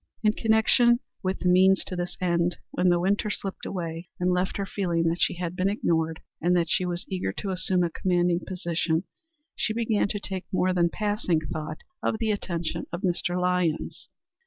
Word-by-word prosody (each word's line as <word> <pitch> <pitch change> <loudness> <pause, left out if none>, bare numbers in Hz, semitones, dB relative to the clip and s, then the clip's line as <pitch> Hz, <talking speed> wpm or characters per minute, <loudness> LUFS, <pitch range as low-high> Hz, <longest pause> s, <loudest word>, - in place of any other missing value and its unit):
In 215 -1 +4
connection 225 +2 +4 0.2
with 185 0 -2
the 180 - 0
means 190 +1 +5
to 185 - -5
this 175 0 -4
end, 175 -1 +1
when 180 - +2
the 175 0 +4
winter 200 +4 +1
slipped 195 -1 -4
away 170 -2 -4
and 180 0 +2
left 180 +1 0
her 200 - -1
feeling 175 -4 0
that 165 +1 0
she - - +2
had 175 0 -4
been 185 +1 +1
ignored, 160 -5 0 0.2
and 175 +2 +3
that 165 -2 0
she 185 - +2
was 175 0 -3
eager 185 - -2
to 195 - -4
assume 185 0 +1
a 170 - 0
commanding 175 0 +1
position, 170 -2 -1 0.5
she 215 - -1
began 225 -3 +1
to 205 - -3
take 190 -2 -4
more 185 0 +2
than 170 -1 +3
passing 205 -4 0
thought 155 0 -5 0.2
of - - 0
the 220 -1 0
attentions 175 -5 -3
of 170 - -4
Mr. 180 0 0
Lyons. 180 -3 -1
180 Hz, 190 wpm, -26 LUFS, 170-195 Hz, 0.5 s, means